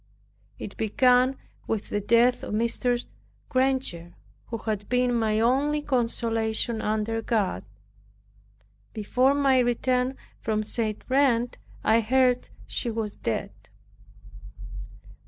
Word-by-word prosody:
It -, -, -7 dB
began 250 Hz, +3 st, +3 dB, 0.3 s
with 220 Hz, -2 st, -2 dB
the 205 Hz, -, -1 dB
death 235 Hz, +4 st, +3 dB
of -, -, -3 dB
Mrs. 240 Hz, +2 st, 0 dB, 0.4 s
Granger, 255 Hz, -, -1 dB, 0.3 s
who 230 Hz, -, -4 dB
had 210 Hz, -2 st, -4 dB
been 250 Hz, 0 st, +2 dB
my 220 Hz, -2 st, +1 dB
only 280 Hz, +6 st, +2 dB
consolation 230 Hz, -3 st, 0 dB
under 220 Hz, +1 st, -1 dB
God. 220 Hz, -4 st, -1 dB, 1.3 s
Before 250 Hz, +5 st, +2 dB
my 275 Hz, -2 st, +3 dB
return 250 Hz, +1 st, +1 dB, 0.2 s
from 215 Hz, -1 st, -1 dB
St. 215 Hz, -1 st, -2 dB
Reine 255 Hz, -3 st, +2 dB, 0.3 s
I 225 Hz, +1 st, +4 dB
heard 250 Hz, +2 st, +2 dB, 0.2 s
she 240 Hz, -, -3 dB
was 220 Hz, -2 st, -3 dB
dead. -, -, -3 dB
235 Hz, 105 wpm, -26 LUFS, 220-255 Hz, 1.3 s, I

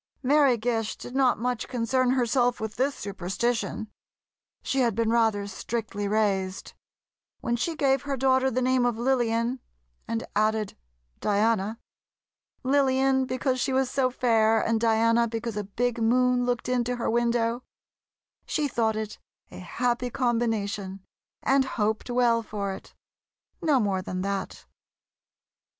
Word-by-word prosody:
Mary 275 Hz, -2 st, +4 dB
Gish 225 Hz, -1 st, -1 dB
did 245 Hz, -, -9 dB
not 265 Hz, -2 st, +3 dB
much 245 Hz, +1 st, -2 dB
concern 250 Hz, +1 st, +1 dB
herself 245 Hz, -1 st, +2 dB
with 220 Hz, -1 st, -5 dB
this 275 Hz, +3 st, 0 dB
superstition; 205 Hz, +4 st, -2 dB, 0.8 s
she 270 Hz, -, -1 dB
had 235 Hz, -5 st, +2 dB
been 225 Hz, 0 st, +1 dB
rather 220 Hz, -3 st, +2 dB
strictly 205 Hz, 0 st, -4 dB
raised; 195 Hz, -3 st, -1 dB, 0.7 s
when 235 Hz, -, 0 dB
she 320 Hz, +8 st, -2 dB
gave 270 Hz, -3 st, +2 dB
her 280 Hz, 0 st, -3 dB
daughter 260 Hz, 0 st, +3 dB
the 255 Hz, 0 st, -1 dB
name 255 Hz, 0 st, +2 dB
of 240 Hz, -2 st, +1 dB
Lillian, 240 Hz, 0 st, +1 dB, 0.5 s
and 230 Hz, 0 st, -2 dB
added 215 Hz, 0 st, +1 dB, 0.4 s
Diana—Lillian 260 Hz, +5 st, -1 dB
because 255 Hz, 0 st, -1 dB
she 270 Hz, -, 0 dB
was 260 Hz, -1 st, +1 dB
so 265 Hz, -2 st, +2 dB
fair, 225 Hz, -3 st, +3 dB
and 225 Hz, -1 st, 0 dB
Diana 230 Hz, +1 st, +3 dB
because 225 Hz, 0 st, -4 dB
a 210 Hz, -1 st, -3 dB
big 235 Hz, +4 st, -2 dB
moon 250 Hz, +2 st, +3 dB
looked 245 Hz, -1 st, -1 dB
into 250 Hz, -1 st, 0 dB
her 240 Hz, -, -3 dB
window—she 235 Hz, +5 st, -3 dB
thought 225 Hz, -4 st, 0 dB
it 215 Hz, -1 st, -5 dB, 0.3 s
a -, -, -9 dB
happy 245 Hz, +7 st, -1 dB
combination 220 Hz, -6 st, -1 dB, 0.4 s
and 270 Hz, 0 st, +3 dB
hoped 215 Hz, +2 st, 0 dB
well 240 Hz, -1 st, +3 dB
for 200 Hz, -3 st, -4 dB
it—no 280 Hz, +8 st, -5 dB
more 195 Hz, -4 st, 0 dB
than 185 Hz, 0 st, -4 dB
that. 195 Hz, 0 st, -4 dB
235 Hz, 130 wpm, -26 LUFS, 220-255 Hz, 0.8 s, Mary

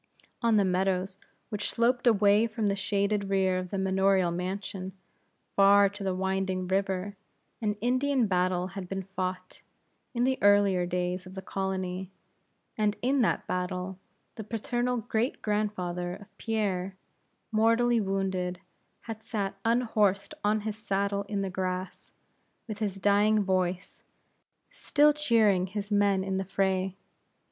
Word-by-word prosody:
On 230 Hz, -2 st, +3 dB
the 200 Hz, -, +4 dB
meadows 190 Hz, +1 st, 0 dB, 0.3 s
which 210 Hz, -2 st, -3 dB
sloped 245 Hz, +1 st, +1 dB
away 210 Hz, 0 st, +5 dB
from 215 Hz, -2 st, -1 dB
the 200 Hz, -, 0 dB
shaded 200 Hz, +1 st, 0 dB
rear 190 Hz, -1 st, +2 dB
of 185 Hz, 0 st, -6 dB
the 195 Hz, -, -3 dB
manorial 190 Hz, -1 st, +2 dB
mansion, 185 Hz, +1 st, -4 dB, 0.6 s
far 200 Hz, 0 st, +6 dB
to 200 Hz, 0 st, -8 dB
the 190 Hz, -1 st, -1 dB
winding 190 Hz, -1 st, -1 dB
river, 195 Hz, +1 st, -1 dB, 0.5 s
an 210 Hz, -2 st, 0 dB
Indian 255 Hz, +1 st, +2 dB
battle 180 Hz, -1 st, 0 dB
had 190 Hz, -1 st, -7 dB
been 195 Hz, 0 st, -3 dB
fought, 185 Hz, -1 st, -5 dB, 0.5 s
in 240 Hz, -, +1 dB
the 260 Hz, +1 st, +1 dB
earlier 200 Hz, -3 st, +4 dB
days 180 Hz, +1 st, -2 dB
of 185 Hz, -, -11 dB
the 190 Hz, -, -5 dB
colony, 190 Hz, -1 st, -3 dB, 0.7 s
and 210 Hz, -1 st, +1 dB
in 265 Hz, +2 st, +2 dB
that 225 Hz, -, +1 dB
battle 180 Hz, +1 st, -3 dB, 0.4 s
the 220 Hz, -, -5 dB
paternal 240 Hz, +3 st, -1 dB
great 230 Hz, +2 st, -1 dB
grandfather 180 Hz, -4 st, -2 dB
of 205 Hz, -, -15 dB
Pierre, 195 Hz, -4 st, -1 dB, 0.6 s
mortally 230 Hz, +2 st, +3 dB
wounded, 190 Hz, -2 st, -2 dB, 0.4 s
had 225 Hz, -1 st, -7 dB
sat 210 Hz, -3 st, -3 dB
unhorsed 215 Hz, -4 st, +1 dB
on 210 Hz, +1 st, +2 dB
his 215 Hz, 0 st, -5 dB
saddle 200 Hz, -1 st, -1 dB
in 200 Hz, -2 st, -1 dB
the 190 Hz, -, -3 dB
grass, 185 Hz, 0 st, -4 dB, 0.6 s
with 215 Hz, -2 st, -6 dB
his 200 Hz, -3 st, -2 dB
dying 205 Hz, +2 st, +3 dB
voice, 185 Hz, -1 st, -1 dB, 0.7 s
still 300 Hz, 0 st, +3 dB
cheering 220 Hz, -10 st, +3 dB
his 205 Hz, +2 st, -5 dB
men 200 Hz, -2 st, +3 dB
in 190 Hz, 0 st, -2 dB
the 190 Hz, -, -2 dB
fray. 190 Hz, 0 st, 0 dB
195 Hz, 140 wpm, -28 LUFS, 185-215 Hz, 0.7 s, far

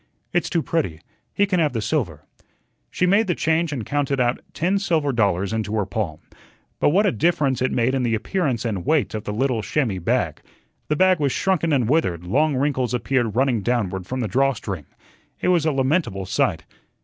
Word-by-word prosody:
"It's 175 Hz, -, +1 dB
too 165 Hz, -3 st, 0 dB
pretty. 115 Hz, -, -1 dB, 0.3 s
He 200 Hz, -, +2 dB
can 190 Hz, -3 st, 0 dB
have 150 Hz, -5 st, +2 dB
the 115 Hz, -, -1 dB
silver." 105 Hz, -, -2 dB, 0.6 s
She 180 Hz, -, 0 dB
made 200 Hz, +4 st, +3 dB
the 175 Hz, -, +1 dB
change 160 Hz, 0 st, +1 dB
and 125 Hz, -7 st, -4 dB
counted 140 Hz, -2 st, -1 dB
out 120 Hz, 0 st, +1 dB
ten 185 Hz, +4 st, 0 dB
silver 160 Hz, -7 st, +1 dB
dollars 100 Hz, -3 st, +1 dB
into 110 Hz, -1 st, -2 dB
her 105 Hz, -3 st, +1 dB
palm. 95 Hz, -10 st, -3 dB, 0.6 s
But -, -, +4 dB
what 195 Hz, +8 st, +3 dB
a 200 Hz, -, +3 dB
difference 150 Hz, -6 st, +1 dB
it 130 Hz, -, +1 dB
made 120 Hz, +2 st, +1 dB
in 135 Hz, -, +1 dB
the 120 Hz, -2 st, +1 dB
appearance 130 Hz, -, -1 dB
and 100 Hz, -6 st, -2 dB
weight 155 Hz, -, +1 dB
of 110 Hz, -1 st, -5 dB
the -, -, -3 dB
little 120 Hz, +1 st, 0 dB
chamois 105 Hz, -2 st, -1 dB
bag! 85 Hz, -, -1 dB, 0.5 s
The 150 Hz, -, +1 dB
bag 185 Hz, +1 st, +4 dB
was 140 Hz, -3 st, +1 dB
shrunken 170 Hz, -1 st, +1 dB
and 130 Hz, -6 st, +2 dB
withered, 110 Hz, -, +1 dB
long 140 Hz, -, +1 dB
wrinkles 130 Hz, -2 st, 0 dB
appeared 120 Hz, -3 st, 0 dB
running 125 Hz, -3 st, +2 dB
downward 95 Hz, -6 st, -1 dB
from 130 Hz, 0 st, -3 dB
the 115 Hz, -, -1 dB
draw 135 Hz, +6 st, +2 dB
string. 95 Hz, -, -6 dB, 0.5 s
It -, -, 0 dB
was 170 Hz, -3 st, +3 dB
a -, -, +3 dB
lamentable 135 Hz, -, 0 dB
sight. 95 Hz, -, 0 dB
130 Hz, 200 wpm, -22 LUFS, 110-160 Hz, 0.6 s, But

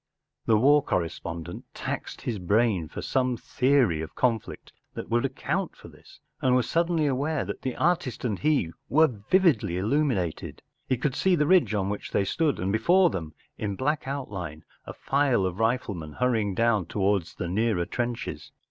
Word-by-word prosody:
The 110 Hz, -, +5 dB
war 145 Hz, +6 st, +5 dB
correspondent 85 Hz, -, -4 dB
taxed -, -, -5 dB
his 110 Hz, -4 st, -3 dB
brain 100 Hz, -2 st, +1 dB
for -, -, -7 dB
some 130 Hz, -2 st, 0 dB
theory 125 Hz, -, +2 dB
of 80 Hz, -, -7 dB
conflict 115 Hz, -4 st, -2 dB, 0.2 s
that -, -, -6 dB
would 120 Hz, +2 st, +2 dB
account 155 Hz, +7 st, -2 dB
for -, -, -13 dB
this, -, -, -18 dB, 0.2 s
and 130 Hz, -1 st, +3 dB
was 125 Hz, -2 st, +2 dB
suddenly 170 Hz, -2 st, +1 dB
aware 145 Hz, +2 st, 0 dB
that -, -, -6 dB
the 130 Hz, -, -3 dB
artist 155 Hz, -8 st, 0 dB
and 105 Hz, -5 st, -1 dB
he 145 Hz, -, +1 dB, 0.2 s
were 155 Hz, +6 st, +6 dB, 0.2 s
vividly 160 Hz, -, +3 dB
illuminated, 105 Hz, -, -1 dB, 0.3 s
He 130 Hz, -, +2 dB
could 135 Hz, +3 st, -1 dB
see 190 Hz, -1 st, +3 dB
the 150 Hz, -2 st, +2 dB
ridge 180 Hz, -9 st, +4 dB
on 95 Hz, -2 st, 0 dB
which 105 Hz, -, -4 dB
they 100 Hz, -, +1 dB
stood, 155 Hz, +6 st, 0 dB
and 95 Hz, +2 st, -1 dB
before 175 Hz, -, +4 dB
them 80 Hz, -5 st, -5 dB, 0.2 s
in 100 Hz, -2 st, -2 dB
black 145 Hz, +5 st, -1 dB
outline 95 Hz, -, -5 dB, 0.2 s
a -, -, -6 dB
file 135 Hz, -8 st, +1 dB
of 95 Hz, +2 st, -3 dB
riflemen 105 Hz, -9 st, -1 dB
hurrying 110 Hz, -6 st, 0 dB
down 110 Hz, -6 st, +2 dB
towards 100 Hz, -3 st, 0 dB
the 90 Hz, -, -4 dB
nearer 100 Hz, -1 st, +1 dB
trenches. 120 Hz, +2 st, -4 dB
115 Hz, 170 wpm, -26 LUFS, 95-140 Hz, 0.3 s, were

